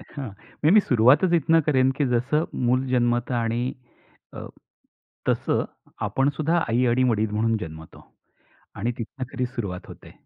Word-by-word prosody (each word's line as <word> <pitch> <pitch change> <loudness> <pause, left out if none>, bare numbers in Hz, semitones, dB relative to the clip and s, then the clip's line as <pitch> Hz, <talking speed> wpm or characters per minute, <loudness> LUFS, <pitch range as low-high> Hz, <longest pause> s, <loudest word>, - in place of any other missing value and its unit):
हां. 135 -5 -5 0.3
मी 155 - +5
नी 215 - +7
सुरुवातच 130 - +4
इथनं 165 0 +4
करेन, 130 -3 +3
की 140 +2 -1
जसं 140 +7 +1 0.2
मूल 130 +2 +2
जन्मत. 120 -1 +1
आणि 120 +1 -1 0.6
अ, - - -7 0.8
तसं - - +1 0.4
आपण 135 +1 +1
सुद्धा 160 +3 +1
आई 120 +2 +2
आणि 120 +2 +2
वडील 110 -1 0
म्हणून 110 +2 +1
जन्मतो. 80 -3 -10 0.7
आणि 115 +5 -2
तिथनं 130 +3 -5
खरी 125 -2 -2
सुरुवात 95 -7 -5
होते. - - -13
125 Hz, 145 wpm, -24 LUFS, 115-140 Hz, 0.8 s, नी